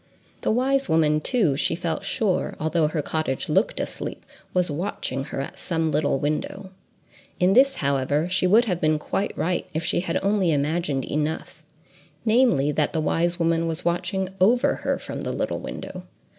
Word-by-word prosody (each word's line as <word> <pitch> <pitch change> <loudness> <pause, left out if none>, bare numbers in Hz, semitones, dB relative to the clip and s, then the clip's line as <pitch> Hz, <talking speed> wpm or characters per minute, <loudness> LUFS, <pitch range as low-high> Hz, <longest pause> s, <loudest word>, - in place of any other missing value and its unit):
The - - 0
wise 265 +1 +2
woman, 155 -1 +3
too, 190 - +2
she 160 +3 +1
felt 165 -1 -3
sure, 200 -5 0
although 160 0 +1
her 150 -1 -2
cottage 155 -4 -2
looked - - +1
asleep, - - -5 0.3
was 180 -3 +1
watching 145 -5 -3
her - - -5
at 140 - -7
some 165 -2 -1
little 145 -1 +1
window. 150 +6 -3 0.7
In 185 +1 +4
this, 270 +4 +5
however, 140 +3 0
she 185 0 +1
would 220 +6 +5
have 180 -6 -2
been 155 0 +3
quite 195 +6 -3
right, 180 +1 -1
if 160 - -1
she - - +1
had 180 - -1
only 195 -3 +2
imagined 150 -2 0
enough—namely, 155 - -1
that 150 0 0
the 160 - 0
wise 170 +2 +1
woman 165 -1 +1
was 165 +1 -3
watching 175 +2 -1
over 235 +6 +4
her - - -1
from - - -6
the - - -3
little - - -2
window. - - -7
165 Hz, 170 wpm, -24 LUFS, 150-190 Hz, 0.7 s, this